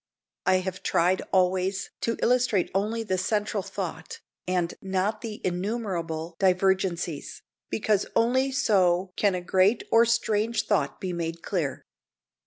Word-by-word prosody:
I 185 Hz, -, +5 dB
have 185 Hz, 0 st, -5 dB
tried 180 Hz, +3 st, +2 dB
always 190 Hz, +1 st, +1 dB
to 230 Hz, -, -1 dB
illustrate 240 Hz, -6 st, +2 dB
only 215 Hz, +4 st, 0 dB
the 185 Hz, -4 st, -1 dB
central 205 Hz, +1 st, 0 dB
thought, 175 Hz, -4 st, -6 dB, 0.3 s
and 180 Hz, -2 st, 0 dB
not 195 Hz, +3 st, -1 dB
the 220 Hz, -3 st, -6 dB
innumerable 175 Hz, -4 st, -3 dB
divergencies, 185 Hz, -4 st, 0 dB, 0.3 s
because 210 Hz, -2 st, +1 dB
only 260 Hz, +4 st, +2 dB
so 185 Hz, -8 st, +2 dB
can 200 Hz, -3 st, +2 dB
a 180 Hz, -, -3 dB
great 190 Hz, +5 st, +3 dB
or 230 Hz, +1 st, +6 dB
strange 225 Hz, -1 st, +1 dB
thought 145 Hz, -10 st, 0 dB
be 185 Hz, -2 st, -3 dB
made 165 Hz, -1 st, -4 dB
clear. 165 Hz, -9 st, -2 dB
190 Hz, 130 wpm, -26 LUFS, 180-215 Hz, 0.3 s, or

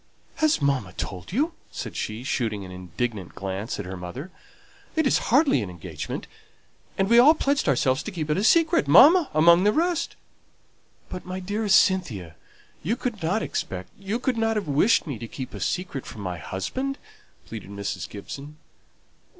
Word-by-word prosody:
"Has 310 Hz, -, +2 dB
mamma 130 Hz, -10 st, 0 dB
told 90 Hz, -, -6 dB
you?" 300 Hz, -, 0 dB, 0.2 s
said -, -, -6 dB
she, 110 Hz, +3 st, -4 dB
shooting 110 Hz, -6 st, -2 dB
an 95 Hz, -, -10 dB
indignant 95 Hz, +3 st, -4 dB
glance 95 Hz, +3 st, -4 dB
at 105 Hz, -, -4 dB
her 95 Hz, +1 st, -6 dB
mother. 95 Hz, -, -7 dB, 0.6 s
"It 315 Hz, -1 st, +2 dB
is 270 Hz, -, +3 dB
hardly 275 Hz, -, +4 dB
an 100 Hz, -, -4 dB
engagement; 85 Hz, -2 st, -6 dB, 0.7 s
and 195 Hz, -, +2 dB
we 235 Hz, +3 st, +6 dB
all 295 Hz, +6 st, +8 dB
pledged 280 Hz, -, +1 dB
ourselves 130 Hz, 0 st, +2 dB
to 220 Hz, -, -6 dB
keep 165 Hz, -5 st, -4 dB
it -, -, +2 dB
a 200 Hz, -, 0 dB
secret, 325 Hz, -, +4 dB
mamma 295 Hz, -, +7 dB
among 170 Hz, +3 st, +6 dB
the 210 Hz, -, +5 dB
rest!" 335 Hz, +4 st, 0 dB, 0.9 s
"But, 180 Hz, -, -7 dB
my 185 Hz, +1 st, -5 dB
dearest 205 Hz, +2 st, +3 dB
Cynthia, 110 Hz, -, -1 dB, 0.5 s
you 205 Hz, +10 st, 0 dB
could 240 Hz, -4 st, -4 dB
not 185 Hz, +7 st, 0 dB
expect 90 Hz, -1 st, -4 dB
you 200 Hz, +3 st, -2 dB
could 250 Hz, 0 st, -1 dB
not 225 Hz, 0 st, +1 dB
have 210 Hz, -6 st, -2 dB
wished 150 Hz, +11 st, +3 dB
me 140 Hz, -8 st, -5 dB
to 115 Hz, -, -6 dB
keep 130 Hz, +2 st, -7 dB
a -, -, -7 dB
secret 180 Hz, -8 st, -3 dB
from 110 Hz, -, -8 dB
my 90 Hz, -3 st, -4 dB
husband?" 260 Hz, -, -3 dB, 0.5 s
pleaded 110 Hz, -4 st, -8 dB
Mrs. 100 Hz, -2 st, -4 dB
Gibson. 140 Hz, +10 st, -8 dB
155 Hz, 175 wpm, -25 LUFS, -, 0.9 s, all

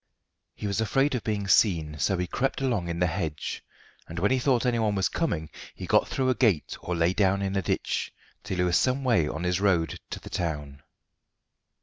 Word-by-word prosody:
He -, -, -7 dB
was 100 Hz, +1 st, 0 dB
afraid 135 Hz, +6 st, +2 dB
of 125 Hz, -, -2 dB
being 105 Hz, -2 st, -2 dB
seen, 80 Hz, -7 st, +3 dB
so 95 Hz, +6 st, +1 dB
he 90 Hz, -, -1 dB
crept 135 Hz, +9 st, -1 dB
along 120 Hz, -10 st, 0 dB
in 85 Hz, 0 st, -3 dB
the 90 Hz, -, +2 dB
hedge, 80 Hz, -4 st, -3 dB, 0.4 s
and 85 Hz, -, -8 dB
when 100 Hz, +7 st, +2 dB
he 130 Hz, -, +3 dB
thought 125 Hz, -1 st, +2 dB
anyone 115 Hz, -4 st, +1 dB
was 95 Hz, -1 st, +2 dB
coming 80 Hz, -, -2 dB, 0.2 s
he -, -, -6 dB
got -, -, +3 dB
through 130 Hz, -1 st, 0 dB
a -, -, +3 dB
gate 110 Hz, -, +1 dB
or 90 Hz, -, -3 dB
lay 85 Hz, +2 st, +2 dB
down 100 Hz, -1 st, +2 dB
in 95 Hz, 0 st, -2 dB
a 95 Hz, -, +2 dB
ditch, 85 Hz, -, -1 dB, 0.3 s
till 95 Hz, -, -4 dB
he 90 Hz, -, +2 dB
was 90 Hz, -1 st, +3 dB
some 130 Hz, +1 st, +1 dB
way 95 Hz, -, +3 dB
on 80 Hz, +2 st, -4 dB
his 90 Hz, +1 st, 0 dB
road 90 Hz, -5 st, +1 dB
to -, -, -5 dB
the -, -, -11 dB
town. 75 Hz, -5 st, -3 dB
95 Hz, 215 wpm, -27 LUFS, 85-115 Hz, 0.4 s, seen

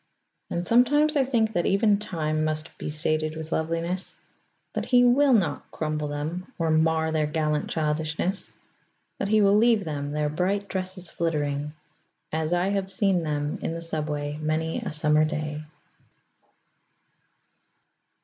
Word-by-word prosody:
And 175 Hz, +1 st, -2 dB
sometimes 290 Hz, -, +4 dB
I 280 Hz, -, +4 dB
think 225 Hz, -4 st, +1 dB
that 175 Hz, -3 st, +1 dB
even 200 Hz, +1 st, +3 dB
Time 155 Hz, -7 st, -2 dB
must 155 Hz, +1 st, -2 dB
be -, -, -4 dB
sated 155 Hz, +1 st, -1 dB
with 160 Hz, 0 st, -7 dB
loveliness; 165 Hz, +3 st, -1 dB, 0.6 s
that -, -, -3 dB
he 245 Hz, -1 st, +5 dB
will 265 Hz, +3 st, +5 dB
not 205 Hz, -9 st, +1 dB
crumble 155 Hz, -1 st, -2 dB
them 155 Hz, +5 st, -4 dB
or 165 Hz, -2 st, 0 dB
mar 160 Hz, 0 st, +2 dB
their 155 Hz, -1 st, +1 dB
gallant 150 Hz, -1 st, -1 dB
childishness; 160 Hz, +4 st, -1 dB, 0.7 s
that -, -, -1 dB
he 215 Hz, +1 st, +4 dB
will 200 Hz, 0 st, +5 dB
leave 225 Hz, -2 st, +4 dB
them, 145 Hz, -3 st, -4 dB
their 150 Hz, 0 st, 0 dB
bright 185 Hz, +6 st, -1 dB
dresses 185 Hz, -2 st, -5 dB
fluttering, 150 Hz, -3 st, -1 dB, 0.6 s
as 160 Hz, +1 st, -1 dB
I 175 Hz, +2 st, +2 dB
have 195 Hz, -1 st, -1 dB
seem 195 Hz, -2 st, +2 dB
them 150 Hz, -2 st, -2 dB
in -, -, -2 dB
the 165 Hz, -, -5 dB
subway 150 Hz, -2 st, -2 dB
many 160 Hz, +1 st, -1 dB
a -, -, -4 dB
summer 150 Hz, 0 st, +3 dB
day. 150 Hz, -1 st, -2 dB
160 Hz, 145 wpm, -26 LUFS, 155-195 Hz, 0.7 s, he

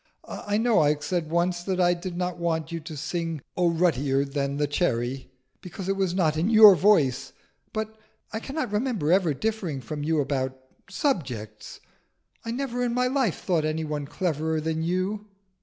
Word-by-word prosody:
I 205 Hz, 0 st, -2 dB
know 230 Hz, 0 st, +3 dB
I 150 Hz, 0 st, +4 dB
said 160 Hz, +2 st, -3 dB
once 175 Hz, +1 st, +1 dB
that 185 Hz, +1 st, -2 dB
I 175 Hz, -1 st, +4 dB
did 175 Hz, 0 st, -6 dB
not 180 Hz, -1 st, -2 dB
want 165 Hz, -1 st, -1 dB
you 165 Hz, -, -3 dB
to 155 Hz, -1 st, -8 dB
sing 165 Hz, +2 st, -3 dB, 0.2 s
'Oh 175 Hz, -1 st, +3 dB
ruddier 145 Hz, -5 st, +1 dB
than 140 Hz, 0 st, -2 dB
the 145 Hz, -, +1 dB
cherry,' 130 Hz, -4 st, -1 dB, 0.3 s
because 190 Hz, +1 st, -7 dB
it 195 Hz, -, +1 dB
was 190 Hz, -2 st, 0 dB
not 160 Hz, -5 st, +2 dB
in 170 Hz, +6 st, +1 dB
your 215 Hz, -3 st, +10 dB
voice. 155 Hz, -10 st, +2 dB, 0.4 s
But 220 Hz, 0 st, -4 dB, 0.3 s
I 220 Hz, -, -2 dB
cannot 270 Hz, -1 st, -4 dB
remember 210 Hz, -, 0 dB
ever 175 Hz, -5 st, +3 dB
differing 205 Hz, -7 st, -2 dB
from 145 Hz, +5 st, -6 dB
you 160 Hz, +1 st, +1 dB
about 130 Hz, -2 st, -1 dB, 0.3 s
subjects. 125 Hz, -, -3 dB, 0.6 s
I 230 Hz, -, -6 dB
never 245 Hz, 0 st, -2 dB
in 240 Hz, -1 st, -1 dB
my 250 Hz, 0 st, +2 dB
life 250 Hz, -, 0 dB
thought 170 Hz, -5 st, +1 dB
any 155 Hz, +1 st, -1 dB
one 150 Hz, -2 st, -4 dB
cleverer 160 Hz, -2 st, -1 dB
than 160 Hz, +1 st, -2 dB
you." 185 Hz, +5 st, -1 dB
170 Hz, 175 wpm, -26 LUFS, 150-200 Hz, 0.6 s, your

